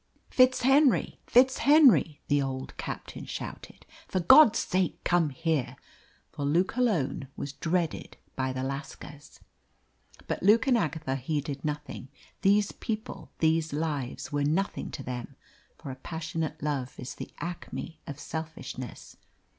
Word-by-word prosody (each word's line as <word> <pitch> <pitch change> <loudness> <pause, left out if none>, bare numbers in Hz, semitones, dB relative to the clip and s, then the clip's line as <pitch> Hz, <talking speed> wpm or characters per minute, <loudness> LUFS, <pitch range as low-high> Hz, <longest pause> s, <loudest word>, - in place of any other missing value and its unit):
"FitzHenry! 260 +2 +4
FitzHenry!" 260 - +5
the 145 -1 +3
old 130 -1 -4
captain - - -6
shouted. - - -8 0.2
"For 185 - -1
God's 250 - +8
sake, 185 0 -1
come 175 -3 +2
here!" 155 -1 -1 0.6
For 145 - -5
Luke 170 +9 +1
alone 165 - 0
was 140 - -5
dreaded 165 +2 -2 0.2
by 130 -1 -1
the 130 0 -3
lascars. 145 +1 -7 0.8
But - - -3
Luke 215 +5 +5
and 265 -3 +4
Agatha 155 - -1
heeded 145 +1 -3
nothing. 150 -3 -4 0.3
These 205 +1 +3
people, 220 -1 -5
these 160 -1 +1
lives, 145 -4 -3
were 145 -1 0
nothing 165 +7 -1
to 145 - -7
them, 125 -1 -6 0.4
for 135 - -7
a - - -7
passionate 160 +1 -4
love 140 -4 -3
is 125 - -6
the - - -8
acme 170 -2 -6
of 145 0 -7
selfishness. 160 -7 -7
160 Hz, 130 wpm, -28 LUFS, 140-190 Hz, 0.8 s, God's